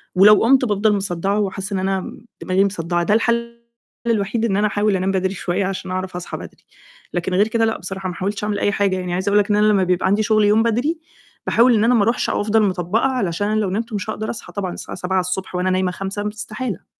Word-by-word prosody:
ولو 205 +3 +7
قُمت 260 +2 +4
بافضَل 210 0 +2
مصدّعة 195 +1 -1
وحاسّة 195 0 -3
إن 190 - 0
أنا 190 0 0
م 230 - -10 0.2
دماغي 190 +2 +2
مصدعة، 175 -3 -1
ده 205 - +1
الحل 235 +1 0 0.5
الوحيد 220 +1 0
إن 195 -3 0
أنا 210 +1 +2
أحاول 205 0 +1
أنام 190 +1 0
بدري 190 0 0
شوية 185 +1 -2
عشان 190 -1 -4
أعرف 185 0 -4
أصحى 175 -1 -5
بدري، - - -12 0.5
لكن 175 +1 -2
غير 200 +3 +3
كده 225 0 +1
لأ 220 - -1
بصراحة، 190 0 -5
ما 175 - -6
حاولتش 200 +2 -3
أعمل 210 -1 -1
أي 205 - +1
حاجة، 195 -1 +1
يعني 180 -1 -3
عايزة 185 +2 -1
أقول 205 - +4
لك 205 0 0
إن 205 - +3
أنا 210 0 +3
لمّا 200 -3 +3
بيبقى 180 0 +1
عندي 205 +3 +2
شغل 215 0 +3
يوم 215 +2 +4
بدري، 250 +9 0 0.5
باحاول 240 +1 +4
إن 215 - +2
أنا 240 +2 +4
ما 225 - +4
أرُوحش 230 +4 0
أو - - 0
أفضَل 220 +1 +2
مطبّقة 190 +3 0
علشان 205 -7 -1
أنا 215 +1 +1
لو 205 - 0
نِمت 225 +4 -3
مش 205 +1 -3
هاقدر 215 0 -3
أصحى 225 - -7
طبعًا 190 -3 -3
الساعة - - -8
07:00 185 0 -2
وأنا 180 +1 0
نايمة 185 0 +1
05:00 195 +3 -4
استحالة. 215 -1 -6
200 Hz, 235 wpm, -20 LUFS, 185-215 Hz, 0.5 s, ولو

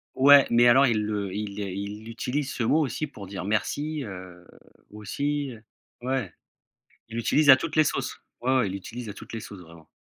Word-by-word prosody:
Ouais, 140 +1 +7
mais 120 +1 +5
alors 135 +4 +6
ils 110 -3 +1
le, 100 -3 -3
ils 105 -1 -4
les 100 -2 -4
ils 100 +2 -6
l'utilisent, 125 +5 -3
ce 120 - -2
mot, 150 +8 +3
aussi 145 +4 -3
pour 100 -8 -11
dire 95 -1 -6
merci, 145 +8 -1
heu, 90 -4 -10 0.5
aussi, 140 +7 -3
heu 110 - -14 0.4
ouais, 125 -8 -2 0.8
ils 115 - -8
l'utilisent 145 +5 +2
à 130 - +12
toutes - - -5
les 155 - +6
sauces. - - -2 0.3
Ouais, 130 +2 0
ouais, 125 -6 +2
ils - - -4
l'utilisent 115 +4 -7
à - - -6
toutes - - -12
les 115 - -3
sauces, 100 -3 -10
vraiment 85 -1 -15
115 Hz, 205 wpm, -26 LUFS, 100-135 Hz, 0.8 s, à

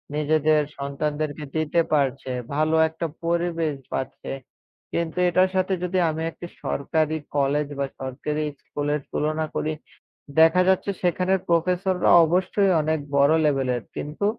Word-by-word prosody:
নিজেদের 155 0 +3 0.2
সন্তানদেরকে 145 +2 -3
দিতে 160 +1 +2
পারছে। 135 -2 0 0.2
ভালো 155 +2 +2
একটা 160 +1 -5 0.2
পরিবেশ 170 -2 0 0.2
পাচ্ছে। 130 - -4 0.6
কিন্তু 170 0 -2
এটার 185 +2 +3
সাথে 185 +1 +1
যদি 180 +1 -1
আমি 160 0 -3
একটি 175 - -9 0.2
সরকারি 155 +2 0 0.2
কলেজ 145 +1 +1
বা 140 - +1 0.2
সরকারি 145 +4 -3 0.2
স্কুলের 145 +1 -2
তুলনা 155 +1 -1
করি। 155 - -1 0.7
দেখা 165 +3 +6
যাচ্ছে 190 +1 +2
সেখানের 185 +2 +2
প্রফেসররা 180 +2 +2 0.2
অবশ্যই 185 +4 +2
অনেক 155 +1 0 0.2
বড় 140 +2 +5
লেভেলের। 130 -5 +1
কিন্তু 150 +7 -3
155 Hz, 125 wpm, -24 LUFS, 145-175 Hz, 0.7 s, দেখা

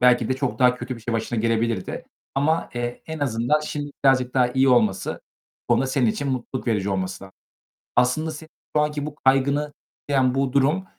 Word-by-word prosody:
belki 125 -2 +4
de 130 - +2
çok 135 -1 -2
daha 125 -2 +5
kötü 125 0 -6
bir - - -12
şey 115 +1 -3
başına 115 +1 -1
gelebilirdi 115 0 -1 0.3
ama, 150 +4 +1
eee, 120 0 -4
en 160 0 -5
azından 135 +2 +1
şimdi 145 -1 -4
birazcık 130 -2 +3
daha 125 -2 +4
iyi 130 +2 +2
olması, 110 -6 +2 0.5
bu - - +4
konuda 135 - +1
senin 130 -1 +1
için 140 +5 -1
mutluluk 130 0 -3
verici 105 -4 0
olması 95 0 -3
lazım. 95 - -14 0.6
Aslında 155 +6 +2
senin 155 +1 -10 0.3
şu - - +5
anki 150 -1 -1
bu 150 -1 -6
kaygını 140 +2 +2 0.4
tetikleyen 130 -2 +2
bu 135 -1 0
durum, 150 +8 +2
130 Hz, 190 wpm, -23 LUFS, 120-145 Hz, 0.6 s, daha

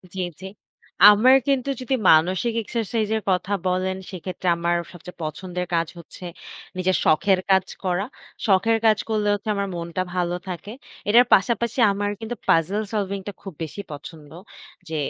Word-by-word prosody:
জ্বী, 185 - -2 0.2
জ্বী। 190 - -7 0.6
আমার 240 +6 +6
কিন্তু 275 -1 +1
যদি 260 +1 0
মানসিক 185 +8 +4
এক্সারসাইজের 220 -1 -1
কথা 190 +2 0
বলেন 185 +1 0 0.2
সেক্ষেত্রে 185 0 -6
আমার 170 0 0 0.2
সবচেয়ে 175 0 -12
পছন্দের 180 +3 -4
কাজ 165 -1 +1
হচ্ছে 180 - -11 0.5
নিজের 185 0 +1
শখের 185 +4 +3
কাজ 190 -1 +4 0.2
করা। 185 +2 0 0.4
শখের 215 +3 +3
কাজ 215 -1 +5
করলে 210 -1 0
হচ্ছে 205 +1 -4
আমার 200 0 -1
মনটা 170 +1 -3
ভালো 175 -1 0
থাকে। 195 +4 -6 0.4
এটার 240 +3 +7
পাশাপাশি 235 +4 +2
আমার 205 +1 -1
কিন্তু 230 +2 -5
পাজল 185 +6 +3
সলভিং 200 -1 -1
টা - - -3
খুব 195 -3 -8
বেশি 160 +6 -6
পছন্দ। 150 +1 -10 0.6
যে 160 - -4
190 Hz, 150 wpm, -23 LUFS, 180-215 Hz, 0.6 s, এটার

